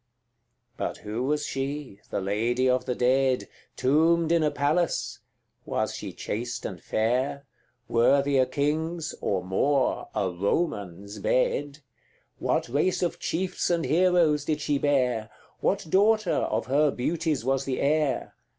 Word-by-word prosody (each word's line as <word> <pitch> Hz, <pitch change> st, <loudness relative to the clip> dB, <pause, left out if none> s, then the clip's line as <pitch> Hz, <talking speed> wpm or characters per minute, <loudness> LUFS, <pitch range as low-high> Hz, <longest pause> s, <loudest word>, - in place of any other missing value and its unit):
C. -, -, -49 dB, 0.7 s
But -, -, -3 dB
who 110 Hz, +3 st, -3 dB
was 150 Hz, +1 st, 0 dB
she, 135 Hz, -5 st, -4 dB
the -, -, -2 dB
lady 115 Hz, +6 st, 0 dB
of 125 Hz, 0 st, +2 dB
the 125 Hz, -, -1 dB
dead, 130 Hz, +1 st, +2 dB, 0.3 s
Tombed 160 Hz, +4 st, +3 dB
in 170 Hz, -1 st, +4 dB
a 150 Hz, -, +3 dB
palace? 145 Hz, +4 st, 0 dB, 0.4 s
Was -, -, -2 dB
she -, -, -6 dB
chaste 120 Hz, +2 st, -4 dB
and 90 Hz, -3 st, -6 dB
fair? 130 Hz, +5 st, 0 dB, 0.4 s
Worthy 140 Hz, +4 st, +3 dB
a 130 Hz, -, +3 dB
king's 155 Hz, +4 st, -1 dB
or 95 Hz, -3 st, 0 dB
more 130 Hz, +9 st, +1 dB
a 95 Hz, -2 st, 0 dB
Roman's 100 Hz, -, -2 dB
bed? 140 Hz, +6 st, 0 dB, 0.6 s
What -, -, 0 dB
race 150 Hz, +9 st, +1 dB
of 175 Hz, -, -1 dB
chiefs 180 Hz, +2 st, -1 dB
and 170 Hz, -2 st, +1 dB
heroes 165 Hz, -1 st, +3 dB
did 150 Hz, -1 st, 0 dB
she 145 Hz, -1 st, 0 dB
bear? 125 Hz, -6 st, +1 dB, 0.3 s
What 200 Hz, -1 st, 0 dB
daughter 205 Hz, +2 st, +3 dB
of -, -, 0 dB
her 145 Hz, +3 st, +3 dB
beauties 155 Hz, +1 st, -1 dB
was 135 Hz, 0 st, +1 dB
the 130 Hz, -2 st, -2 dB
heir? 150 Hz, -1 st, +1 dB
140 Hz, 140 wpm, -26 LUFS, 125-155 Hz, 0.7 s, in